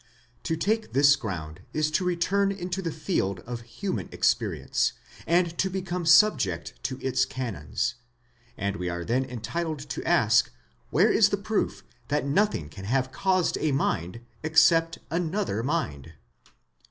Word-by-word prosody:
To 160 - 0
take 215 +6 -1
this 140 +1 +6
ground 85 - -6
is 155 0 +1
to 185 - +1
return 180 +3 +1
into 185 -1 -4
the 165 -3 -3
field 150 - -1
of 120 +2 -6
human 120 +12 -4
experience, - - +1 0.3
and 170 0 +2
to 190 - +2
become 180 -2 -3
subject 160 - +4
to 130 - -2
its 130 0 +2
canons, 120 - -3 0.6
and 100 +1 -2
we 90 -2 -3
are 85 0 -4
then 125 +3 +1
entitled 135 +7 -4
to - - -4
ask 115 -11 +3 0.4
where - - +4
is - - +5
the - - 0
proof - - -2 0.2
that 145 0 0
nothing 145 - +1
can 95 +6 -10
have 130 +4 0
caused 185 +1 +1
a 155 - +1
mind 90 - -1 0.2
except 165 +1 +4
another 170 - -1
mind. 100 - -3
150 Hz, 145 wpm, -27 LUFS, 110-175 Hz, 0.6 s, this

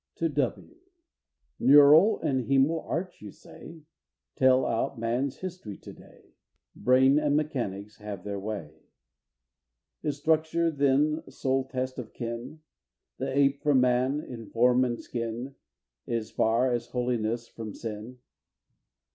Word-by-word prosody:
TO - - -1
W. - - -2
I. - - -36 0.8
"Neural 145 +8 +7
and 130 -5 -1
hæmal 140 +5 +2
arch," 180 +2 -4
you 105 - -8
say, 165 - -13 0.5
"Tell 130 0 +4
out 115 0 -1
man's 120 +4 -2
history 180 - -7
to - - -12
day, - - -19 0.4
Brain 130 +3 +4
and 145 -1 +1
mechanics 105 -9 -3
have 105 -4 -7
their 100 -1 -4
way." 95 -7 -6 1.2
Is 145 -2 -2
structure 160 +2 +1
then 145 +2 +2
sole 135 -1 -1
test 130 0 -4
of 115 -3 -8
kin? 120 +6 -6 0.6
The - - -2
ape 140 0 +3
from 145 -3 +3
man, 125 +3 +1
in 115 -6 -9
form 125 +2 +3
and 120 -1 -3
skin, 120 +3 -5 0.5
Is 115 -2 -3
far 115 +3 +2
as 120 -1 -2
holiness 120 -2 -2
from 110 -3 -8
sin! 110 +2 -7
130 Hz, 130 wpm, -27 LUFS, 115-145 Hz, 1.2 s, Neural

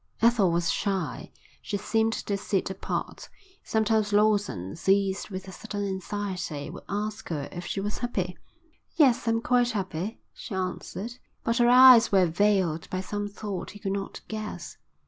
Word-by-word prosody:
Ethel 230 -5 +4
was 170 0 +1
shy. 195 -3 -2 0.3
She 200 - -3
seemed 225 +2 +1
to 200 - -2
sit 195 -1 -1
apart. - - -4 0.3
Sometimes 220 -1 +1
Lawson, 205 - +1
seized 195 +4 +1
with 190 -1 -6
a - - -7
sudden 205 0 -5
anxiety, 190 -5 -4
would - - -10
ask 210 +2 -3
her 145 -4 -3
if 175 0 -6
she - - -2
was 205 +2 -3
happy. 190 -7 -2 0.6
"Yes, 270 -8 +4
I'm 230 0 +2
quite 245 0 +3
happy," 195 -2 -3
she 205 - -7
answered. 190 +4 -4 0.3
But 230 0 +1
her 240 0 +5
eyes 250 -2 +9
were 190 -2 +5
veiled 180 -2 +1
by 185 - -2
some 205 +2 -3
thought 205 -2 -5
he 205 - -11
could 195 - -3
not 195 0 -5
guess. 215 -1 -6
205 Hz, 160 wpm, -27 LUFS, 185-220 Hz, 0.6 s, eyes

